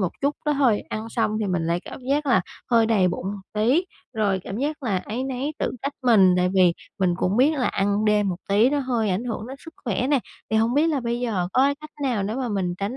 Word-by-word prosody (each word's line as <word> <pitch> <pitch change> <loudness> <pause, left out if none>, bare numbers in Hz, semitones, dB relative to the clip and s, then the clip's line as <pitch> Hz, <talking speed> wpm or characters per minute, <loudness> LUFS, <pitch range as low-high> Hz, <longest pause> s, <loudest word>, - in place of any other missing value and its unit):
một 185 - +1
chút 280 +2 0
đó 300 - +3
thôi, 260 -7 +2
ăn 220 +1 -4
xong 225 -2 0
thì 210 - 0
mình 180 -4 -1
lại 170 +1 0
cảm - - -8
giác 290 +1 +1
là 240 -8 +4 0.3
hơi 230 -1 +4
đầy 205 -5 +3
bụng 180 +1 -4
một 200 0 -4
tí, 245 - +2 0.3
rồi 200 -3 +1
cảm 195 - -5
giác 295 +3 -2
là 200 -7 0
áy 230 +7 -4
náy 265 +3 -3
tự - - -1
trách 280 +1 -2
mình, 200 -7 +5
tại 180 0 +2
vì 180 -2 +5 0.3
mình 180 -2 +2
cũng 185 +2 0
biết 265 +5 +5
là 250 - +1
ăn 200 +2 0
đêm 210 -2 +3
một 180 - -2
tí 215 +6 +4
nó 290 - +1
hơi 240 -6 0
ảnh 190 +6 -1
hưởng 225 -2 -4
đến 265 +2 -8
sức 325 - -11
khỏe 240 +2 0
nè. 285 -1 +3 0.3
Thì 220 - +2
hông 225 +2 +2
biết 300 +3 +4
là 305 -4 0
bây 235 0 -2
giờ 195 -8 -1
có 260 - +4
cái 280 +1 +2
cách 305 0 -10
nào 245 -7 0
để 210 +3 -2
mà 255 -2 -2
mình 190 -4 -1
tránh 205 +6 -3
225 Hz, 270 wpm, -24 LUFS, 195-260 Hz, 0.3 s, mình